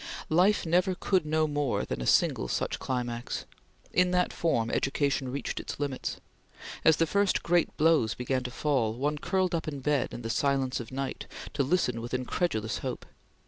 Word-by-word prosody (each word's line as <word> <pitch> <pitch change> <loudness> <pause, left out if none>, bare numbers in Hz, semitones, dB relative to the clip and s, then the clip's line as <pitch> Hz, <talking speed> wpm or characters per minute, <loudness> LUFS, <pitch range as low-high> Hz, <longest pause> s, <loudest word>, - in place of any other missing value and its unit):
Life 180 +6 +4
never 180 +3 +2
could 180 -3 +1
know 155 +1 +2
more 145 -3 0
than - - -4
a - - -3
single 60 - +3
such - - -1
climax. 120 -2 -3 0.5
In 180 0 +4
that 180 0 +1
form, 115 -9 0
education 135 -2 0
reached 140 - -3
its - - -6
limits. 140 -3 -3 0.7
As 160 - +6
the 165 - +3
first 200 +4 +1
great 175 0 +1
blows 155 -8 +3
began 130 +1 -1
to - - -2
fall, 125 -4 0
one 145 +4 -1
curled 185 +2 0
up 165 -2 -1
in 145 -2 -4
bed 145 0 0
in 120 - -7
the 115 - -2
silence 135 +1 +1
of 120 0 -7
night, 135 0 -4 0.3
to - - 0
listen 130 -5 +1
with 120 +2 -3
incredulous 125 - -1
hope. - - -5
145 Hz, 180 wpm, -29 LUFS, 125-165 Hz, 0.7 s, As